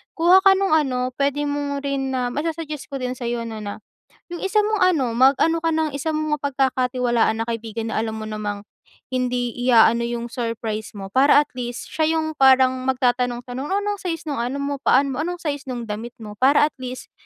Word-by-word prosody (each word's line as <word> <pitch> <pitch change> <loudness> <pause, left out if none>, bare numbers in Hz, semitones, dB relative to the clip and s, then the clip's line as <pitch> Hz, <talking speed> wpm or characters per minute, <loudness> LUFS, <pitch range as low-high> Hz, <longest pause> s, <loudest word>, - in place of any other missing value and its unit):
kuha 345 +3 +6
ka 390 - +8
nung 390 -2 0
ano, 255 -4 0
pwede 285 +1 +1
mong 285 -1 -2
rin 270 -1 -2
na 250 -1 -1
masa-suggest 305 +1 -4
ko 275 -2 -4
din 250 0 -2
sa'yo 240 -1 -3
no 225 -1 -6
na 205 0 -7 0.5
yung 345 - -5
isa 395 +2 +2
mong 430 0 0
ano, 330 -8 +3
mag-ano 275 +6 +4
ka 330 - +2
ng 315 -1 +1
isa 300 +3 -2
mong 305 -1 -1
mapag-kakatiwalaan 250 -4 +1
na - - -9
kaibigan 230 -1 -4
na 220 - 0
alam 220 0 -2
mo 220 - -6
namang, 205 -1 -4 0.5
hindi 250 -1 -1 0.2
i-aano 235 -1 +5
yung 235 0 -4
surprise 230 -2 -4
mo 195 -1 -6
para 275 +5 +5
atl 255 -3 -12
east 240 - -7
siya 320 0 +1
yung 315 0 -1
parang 260 -2 +5 0.2
magtatanong-tanong 250 +1 -1
o - - -1
anong 410 -1 -3
size 330 -3 -3
nung 285 -4 -2
ano 250 +4 -2
mo 280 0 -2
paa 275 +2 +3
mo? 255 - -4
Anong 355 +2 -3
size 285 -4 -4
nung 245 -2 -4
damit 220 +3 -6
mo? 210 -2 -9
Para 275 +3 +5
at - - -12
least, 255 0 -7
260 Hz, 200 wpm, -22 LUFS, 240-295 Hz, 0.5 s, ka